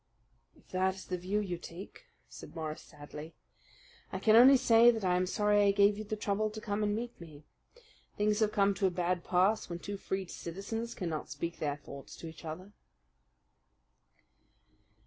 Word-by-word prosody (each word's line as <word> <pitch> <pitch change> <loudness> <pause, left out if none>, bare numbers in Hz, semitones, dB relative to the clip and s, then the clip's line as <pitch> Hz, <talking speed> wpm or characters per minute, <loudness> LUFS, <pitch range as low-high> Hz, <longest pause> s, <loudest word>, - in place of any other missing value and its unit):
"If - - -24
that 185 0 +1
is 190 - -10
the 180 - -3
view 190 +4 -1
you 180 -4 -4
take," 185 - -10 0.2
said - - -12
Morris 155 -1 -4
sadly, 150 +2 -11 0.8
"I - - -3
can 220 -1 +4
only 260 +4 +9
say 235 -2 +6
that 225 -3 +1
I 180 -1 +3
am 180 0 +1
sorry 210 +1 +2
I 200 -1 +5
gave 200 +1 +4
you 215 - -5
the 215 +1 -3
trouble 210 0 -1
to 215 +1 -7
come 210 -1 -2
and 205 0 +1
meet 235 -3 -6
me. 155 -3 -12 0.7
Things 210 0 +2
have 215 -1 +2
come 200 -1 +3
to 195 0 +1
a - - +2
bad 180 0 -1
pass 190 +4 +2
when 170 - -4
two 200 +3 -6
free 190 0 -3
citizens 200 +7 -5
cannot 165 -6 -4
speak 165 +5 -5
their 145 -2 -1
thoughts 140 -1 -11
to 165 - -9
each 160 - -11
other." 170 +5 -7
195 Hz, 185 wpm, -32 LUFS, 170-210 Hz, 0.8 s, only